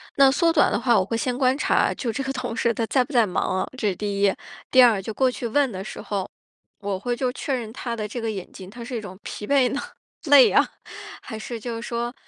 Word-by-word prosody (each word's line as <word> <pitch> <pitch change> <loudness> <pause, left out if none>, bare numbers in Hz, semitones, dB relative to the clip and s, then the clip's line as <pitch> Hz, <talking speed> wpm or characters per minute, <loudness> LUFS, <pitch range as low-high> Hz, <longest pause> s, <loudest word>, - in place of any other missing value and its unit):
那 275 -1 +6
缩 330 +4 +2
短 305 - +4
的 - - 0
话， 240 -5 +3
我 - - +2
会 230 +3 -2
先 250 +1 -1
观 260 0 +2
察， - - +2
就 235 -3 -3
这 270 +5 -3
个 270 - -2
同 250 -3 -4
事 235 0 +1
他 230 - -1
在 255 +2 +2
不 250 - -12
在 235 -4 +4
忙 185 -1 -1
啊， - - -3
这 215 -5 0
是 190 - -2
第 200 +1 -3
一。 200 -1 +5 0.4
第 255 - +6
二， 225 -5 +4
就 215 +3 -6
过 260 +3 +2
去 245 -1 -4
问 275 +2 +1
的 190 -1 -5
时 215 - -8
候， 195 -2 -3 0.5
我 200 -2 -3
会 245 +4 -2
就 250 0 -1
确 275 - -3
认 230 -3 -6
他 240 -3 -4
的 215 -2 -4
这 235 +3 -5
个 225 - -2
眼 195 -4 -6
睛， 185 -1 -11
他 235 +3 -9
是 245 +2 -6
一 225 - -3
种 190 -3 -9
疲 210 - -7
惫 270 -3 +3
呢， 285 - -2 0.4
累 285 -3 +7
啊， - - +4 0.5
还 220 - -7
是 230 +1 -6
就 230 0 -5
是 - - -7
说 235 0 -3
235 Hz, 290 characters per minute, -24 LUFS, 210-255 Hz, 0.5 s, 累